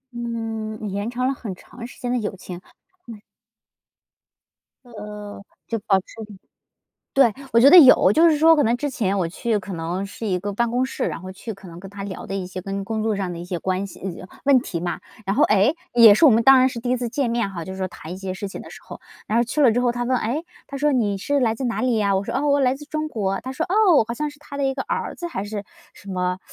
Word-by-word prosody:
嗯， 225 Hz, -3 st, -4 dB
延 205 Hz, +3 st, -3 dB
长 250 Hz, +1 st, -1 dB
了 270 Hz, -, +1 dB
很 215 Hz, -8 st, -7 dB
长 235 Hz, +5 st, -11 dB
时 -, -, -15 dB
间 245 Hz, -, -3 dB
的 250 Hz, -, +1 dB
友 210 Hz, -3 st, -4 dB
情 180 Hz, -1 st, -9 dB, 0.5 s
嗯。 220 Hz, -3 st, -10 dB, 1.6 s
呃， 210 Hz, -3 st, -9 dB, 0.3 s
就 225 Hz, -2 st, -2 dB
保 195 Hz, -, +5 dB
持 185 Hz, -, -14 dB, 1.1 s
对， 260 Hz, -5 st, +5 dB, 0.2 s
我 230 Hz, -, +5 dB
觉 275 Hz, +3 st, +8 dB
得 365 Hz, -, +10 dB
有。 265 Hz, -5 st, +8 dB
就 330 Hz, +2 st, +5 dB
是 310 Hz, -, +3 dB
说 320 Hz, +2 st, +6 dB
可 290 Hz, -, +3 dB
能 235 Hz, +1 st, +2 dB
之 290 Hz, +2 st, -3 dB
前 200 Hz, -5 st, -1 dB
我 175 Hz, -3 st, 0 dB
去 220 Hz, +5 st, -2 dB
可 190 Hz, +1 st, -8 dB
能 170 Hz, +4 st, -3 dB
是 215 Hz, +3 st, -7 dB
一 185 Hz, -, 0 dB
个 205 Hz, +1 st, -4 dB
办 235 Hz, +3 st, 0 dB
公 250 Hz, +1 st, +1 dB
室， 260 Hz, -, -3 dB
然 -, -, -4 dB
后 185 Hz, -, -7 dB
去 210 Hz, +3 st, -7 dB
可 195 Hz, -1 st, -14 dB
能 170 Hz, 0 st, -11 dB
跟 195 Hz, +1 st, -10 dB
他 200 Hz, 0 st, -8 dB
聊 195 Hz, -2 st, -7 dB
的 195 Hz, -, -5 dB
一 195 Hz, -, -3 dB
些 185 Hz, 0 st, -7 dB
跟 195 Hz, +1 st, -4 dB
工 220 Hz, +1 st, -3 dB
作 220 Hz, -, +1 dB
上 190 Hz, -3 st, -3 dB
的 170 Hz, -, -7 dB
一 170 Hz, -, -7 dB
些 180 Hz, 0 st, -4 dB
关 190 Hz, +1 st, -1 dB
系 185 Hz, -1 st, -8 dB, 0.2 s
问 280 Hz, -2 st, +5 dB
题 175 Hz, -, -5 dB
嘛， 175 Hz, 0 st, -3 dB, 0.3 s
然 195 Hz, +2 st, -1 dB
后， -, -, +5 dB
哎， 210 Hz, +5 st, +3 dB, 0.2 s
也 230 Hz, -3 st, +8 dB
是 265 Hz, -, +4 dB
我 -, -, +8 dB
们 230 Hz, +1 st, +4 dB
当 270 Hz, +2 st, +7 dB
然 255 Hz, +1 st, +5 dB
是 235 Hz, -2 st, -6 dB
第 245 Hz, +1 st, -3 dB
1 255 Hz, -, +2 dB
次 245 Hz, -1 st, -3 dB
见 245 Hz, 0 st, -1 dB
面 235 Hz, -3 st, 0 dB
哈， 170 Hz, -4 st, -6 dB
就 190 Hz, -, -8 dB
是 190 Hz, -, -8 dB
说 190 Hz, -, -1 dB
谈 170 Hz, -2 st, -10 dB
一 -, -, -6 dB
些 190 Hz, -1 st, -5 dB
事 200 Hz, +1 st, -5 dB
情 -, -, -8 dB
的 -, -, -11 dB
时 -, -, -12 dB
候。 -, -, -10 dB, 0.3 s
然 225 Hz, +2 st, +2 dB
后 235 Hz, -, +3 dB
去 280 Hz, +5 st, -2 dB
了 255 Hz, -5 st, +6 dB
之 245 Hz, +3 st, +1 dB
后 245 Hz, -1 st, +1 dB
他 245 Hz, 0 st, -3 dB
问： 250 Hz, 0 st, +1 dB
“诶？” 265 Hz, +9 st, -2 dB, 0.2 s
他 280 Hz, -, -7 dB
说： 295 Hz, +2 st, +2 dB
“你 215 Hz, -7 st, +1 dB
是 285 Hz, +8 st, -1 dB
来 225 Hz, -4 st, +1 dB
自 265 Hz, -, -7 dB
哪 230 Hz, -, -2 dB
里 250 Hz, -3 st, +1 dB
呀？” 200 Hz, -2 st, +2 dB
我 195 Hz, -, -4 dB
说： -, -, -5 dB
“啊， 285 Hz, -, 0 dB
我 285 Hz, -1 st, +3 dB
来 260 Hz, -1 st, +2 dB
自 295 Hz, +2 st, -10 dB
中 310 Hz, +1 st, -3 dB
国”， 195 Hz, -7 st, -2 dB
他 260 Hz, -, -5 dB
说， 320 Hz, -, -2 dB
哦， 375 Hz, -, +4 dB
好 235 Hz, -, -2 dB
像 300 Hz, +5 st, -3 dB
是 290 Hz, 0 st, -13 dB
他 285 Hz, -1 st, -10 dB
的 280 Hz, -, -1 dB
一 270 Hz, 0 st, 0 dB
个 265 Hz, -, -3 dB
儿 -, -, -3 dB
子 345 Hz, -, -6 dB
还 200 Hz, -, -4 dB
是 205 Hz, -1 st, -5 dB, 0.3 s
什 200 Hz, -, -12 dB
么， 180 Hz, 0 st, -1 dB
225 Hz, 290 characters per minute, -22 LUFS, 195-260 Hz, 1.6 s, 得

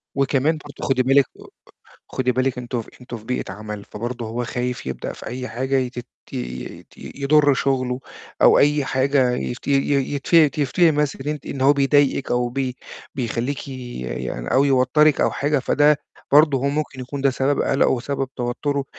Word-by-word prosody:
وكمان 140 Hz, +3 st, +1 dB
برضه 145 Hz, -1 st, -8 dB
خُدي 130 Hz, -1 st, +3 dB
بالِك 135 Hz, +1 st, +4 dB
آآ -, -, -13 dB, 0.6 s
خُدي 125 Hz, -1 st, 0 dB
بالِك 130 Hz, 0 st, 0 dB
أنتم 120 Hz, -1 st, -3 dB, 0.2 s
أنتم 125 Hz, -1 st, -7 dB
في 110 Hz, -, -13 dB
بيئة 125 Hz, -5 st, -3 dB
عَمَل، 105 Hz, 0 st, -7 dB
فبرضه 120 Hz, +2 st, -5 dB
هو 120 Hz, +2 st, -3 dB
خايف 125 Hz, -, -3 dB
يبدأ 65 Hz, -, -4 dB
في -, -, -11 dB
أي 125 Hz, +1 st, -5 dB
حاجة 130 Hz, +4 st, -1 dB
يتت 125 Hz, -2 st, -2 dB, 0.3 s
يت 60 Hz, 0 st, -6 dB
يضُر 145 Hz, 0 st, +2 dB
شُغله 130 Hz, -1 st, 0 dB, 0.4 s
أو -, -, +7 dB
أي 145 Hz, 0 st, +3 dB
حاجة 130 Hz, -1 st, +2 dB
يت 125 Hz, +1 st, -4 dB
ي -, -, +3 dB
ي 140 Hz, 0 st, +1 dB
يتف 150 Hz, +1 st, +3 dB
يفتري 160 Hz, +4 st, +3 dB
مثلًا 145 Hz, -2 st, -1 dB
إن -, -, 0 dB
أنتِ 150 Hz, -2 st, -6 dB
إن 135 Hz, -, -5 dB
هو 135 Hz, +2 st, +6 dB
بيضايقِك 140 Hz, -1 st, +2 dB
أو 120 Hz, 0 st, +1 dB
بي 130 Hz, 0 st, -3 dB, 0.4 s
بيخلّيكِ 125 Hz, +3 st, -3 dB
يعني 90 Hz, -, -5 dB
أو 135 Hz, -, +4 dB
يوتَّرك 140 Hz, +3 st, +3 dB
أو -, -, +3 dB
حاجة، 145 Hz, +1 st, 0 dB
فده 145 Hz, +3 st, +3 dB, 0.4 s
برضه 145 Hz, -1 st, +6 dB
هو 135 Hz, +2 st, 0 dB
ممكن 145 Hz, -2 st, -3 dB
يكون 135 Hz, +3 st, -5 dB
ده 135 Hz, 0 st, +3 dB
سبَب 135 Hz, +2 st, 0 dB
قَلَقه 135 Hz, -, +2 dB
وسبِّب 135 Hz, +2 st, -2 dB
توتُّره، 135 Hz, +3 st, -2 dB
135 Hz, 175 wpm, -22 LUFS, 125-140 Hz, 0.6 s, أو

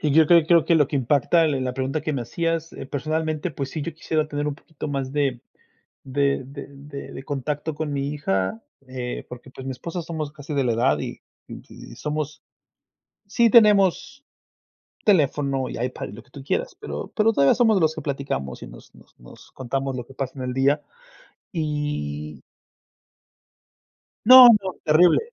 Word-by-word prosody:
y 150 Hz, -, 0 dB
yo 160 Hz, +1 st, +6 dB
creo 170 Hz, -1 st, +5 dB
creo 170 Hz, -1 st, +5 dB
que 170 Hz, -, +3 dB
lo 150 Hz, -4 st, +4 dB
que 145 Hz, -, -1 dB
impacta 145 Hz, +5 st, +2 dB
en 135 Hz, -4 st, -1 dB
la 125 Hz, 0 st, -3 dB
pregunta 135 Hz, +3 st, -2 dB
que 155 Hz, -, -2 dB
me 130 Hz, -, -2 dB
hacías, 165 Hz, +5 st, -2 dB
eh, -, -, -8 dB
personalmente, 155 Hz, +3 st, -2 dB
pues 140 Hz, -2 st, -5 dB
sí, 155 Hz, -, -4 dB
yo 165 Hz, +2 st, -5 dB
quisiera 155 Hz, -1 st, -1 dB
tener 145 Hz, 0 st, -3 dB
un 145 Hz, -, -3 dB
poquito 155 Hz, 0 st, -8 dB
más 135 Hz, -2 st, -3 dB
de 140 Hz, -4 st, 0 dB, 0.6 s
de 140 Hz, 0 st, 0 dB
de 140 Hz, +2 st, -9 dB
de 140 Hz, 0 st, -10 dB
de 135 Hz, -, -8 dB
contacto 145 Hz, +2 st, -3 dB
con 150 Hz, -1 st, -3 dB
mi 140 Hz, 0 st, -2 dB
hija, 95 Hz, -6 st, -1 dB, 0.3 s
eh, 125 Hz, -1 st, -5 dB
porque, 125 Hz, +1 st, -11 dB
pues, 130 Hz, -, -10 dB
mi 135 Hz, -, -3 dB
esposa, 170 Hz, +7 st, -5 dB
somos 155 Hz, -3 st, -5 dB
casi 150 Hz, 0 st, -8 dB
de 140 Hz, -2 st, +1 dB
la 120 Hz, -, +1 dB
edad, 110 Hz, -10 st, +2 dB
y -, -, -6 dB, 0.3 s
y -, -, -12 dB
somos 150 Hz, 0 st, -4 dB, 0.9 s
Sí 235 Hz, +3 st, +3 dB
tenemos 210 Hz, +4 st, +4 dB, 0.8 s
teléfono 140 Hz, -, +2 dB
y -, -, -6 dB
iPad 125 Hz, +1 st, -4 dB
y -, -, -10 dB
lo 110 Hz, -, -11 dB
que -, -, -30 dB
tú 140 Hz, -2 st, -10 dB
quieras, -, -, -2 dB
pero -, -, -6 dB
pero 225 Hz, +1 st, +3 dB
todavía 140 Hz, -7 st, +4 dB
somos 225 Hz, -5 st, +3 dB
los 160 Hz, 0 st, +2 dB
que -, -, -5 dB
platicamos 135 Hz, -, -4 dB
y -, -, -8 dB
nos -, -, -15 dB
nos -, -, -22 dB
nos -, -, -16 dB
contamos 135 Hz, +1 st, -3 dB
lo 125 Hz, -2 st, -5 dB
que 135 Hz, -, -14 dB
pasa 130 Hz, -1 st, -4 dB
en -, -, -4 dB
el 125 Hz, -, -3 dB
día 140 Hz, +3 st, +2 dB, 0.7 s
y 145 Hz, -, -3 dB, 1.8 s
No, 255 Hz, +2 st, +11 dB
no, 190 Hz, -2 st, -5 dB
terrible. 160 Hz, +2 st, +5 dB
145 Hz, 185 wpm, -23 LUFS, 130-160 Hz, 1.8 s, No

